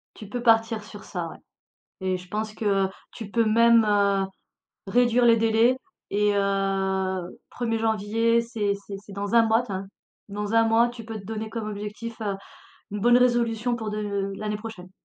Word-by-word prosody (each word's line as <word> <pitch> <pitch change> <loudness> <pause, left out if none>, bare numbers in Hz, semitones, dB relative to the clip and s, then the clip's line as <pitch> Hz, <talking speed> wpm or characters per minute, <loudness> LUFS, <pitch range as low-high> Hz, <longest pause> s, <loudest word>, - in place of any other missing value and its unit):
Tu 210 - -10
peux 245 +3 -4
partir 225 -2 +3
sur 205 -2 -11
ça, 175 -3 -4
ouais - - -10 0.7
et 185 0 0
je 180 0 -11
pense 215 +2 -3
que 200 -3 +1 0.2
tu 220 -4 -8
peux 230 +2 +2
même, 230 +1 +5
heu, 200 -1 +3 0.6
réduire 245 +2 +3
les 230 -1 +6
délais 225 +2 +3 0.3
et 205 0 +2
heu, 195 -2 -1
1er 225 -2 -2
janvier, 225 +1 +2
c'est 225 -3 -1
c'est 200 - -6
c'est 205 0 -13
dans 200 +2 -3
1 230 -1 +6
mois, 225 +2 +3
tiens. 195 -5 -5 0.4
Dans 205 +1 -4
1 225 0 +5
mois, 225 +1 +4
tu 240 -1 -9
peux 225 0 -6
te - - -15
donner 220 +1 -4
comme 225 -2 -4
objectif, 210 +3 -6
heu, 205 -2 -1 0.6
1 210 - -3
bonne 240 +3 +5
résolution 240 -1 +2
pour 220 -2 -4
de 200 -2 -2
l'année 210 0 -3
prochaine. 210 -4 -9
215 Hz, 180 wpm, -25 LUFS, 200-230 Hz, 0.7 s, les